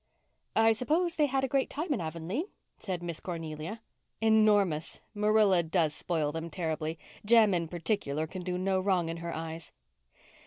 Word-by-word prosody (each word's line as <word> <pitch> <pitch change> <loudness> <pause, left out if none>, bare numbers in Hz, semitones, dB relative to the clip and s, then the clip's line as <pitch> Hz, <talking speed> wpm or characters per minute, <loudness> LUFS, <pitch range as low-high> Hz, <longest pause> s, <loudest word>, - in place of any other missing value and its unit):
"I 225 0 +5
suppose 315 +10 +1
they 300 -3 +2
had 270 0 0
a - - +2
great 270 +1 +1
time 305 +1 -2
in 235 - -2
Avonlea?" 170 - -3 0.3
said 180 -4 -4
Miss 170 -2 -4
Cornelia. 165 +4 -5 0.4
"Enormous. 210 -7 +3
Marilla 210 -3 +4
does 160 -2 +1
spoil 155 -4 -1
them 165 +2 -5
terribly. 160 -2 -3 0.3
Jem, 220 -2 +5
in 170 -2 0
particular, 165 -3 -1
can 185 +3 -7
do 180 0 -2
no 190 +1 +1
wrong 185 -3 +1
in 165 - -4
her 170 0 -5
eyes." 160 -1 -6
180 Hz, 160 wpm, -30 LUFS, 165-220 Hz, 0.4 s, I